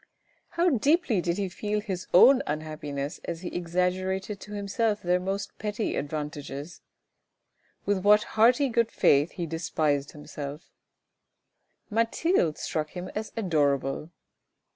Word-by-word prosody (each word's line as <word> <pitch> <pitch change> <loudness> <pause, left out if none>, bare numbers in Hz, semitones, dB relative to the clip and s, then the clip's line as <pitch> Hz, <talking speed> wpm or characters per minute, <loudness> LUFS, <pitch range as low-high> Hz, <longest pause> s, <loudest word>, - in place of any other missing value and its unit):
How 350 +1 +4
deeply 275 - +2
did 170 +1 -1
he 200 -1 -1
feel 210 +3 -2
his 190 -4 -5
own 260 +9 +7
unhappiness 150 -2 -4
as 170 -1 -4
he 180 - -4
exaggerated 185 +3 -1
to 210 - -10
himself 210 +1 -1
their 180 +1 +2
most 195 +2 -3
petty 210 +1 -2
advantages. 145 +1 -5 1.0
With 200 -1 +1
what 210 +2 +5
hearty 245 +6 +5
good 230 -1 +2
faith 145 +4 +3
he 175 - -3
despised 155 -3 -1
himself. 150 +1 -8 1.2
CRUEL 215 - -5
MOMENTS 230 0 +1
359 350 +3 +3
Mathilde 155 -2 -4
struck 155 -1 -2
him 180 +1 -5
as 215 +1 -4
adorable. 145 -6 0
180 Hz, 135 wpm, -27 LUFS, 155-210 Hz, 1.2 s, own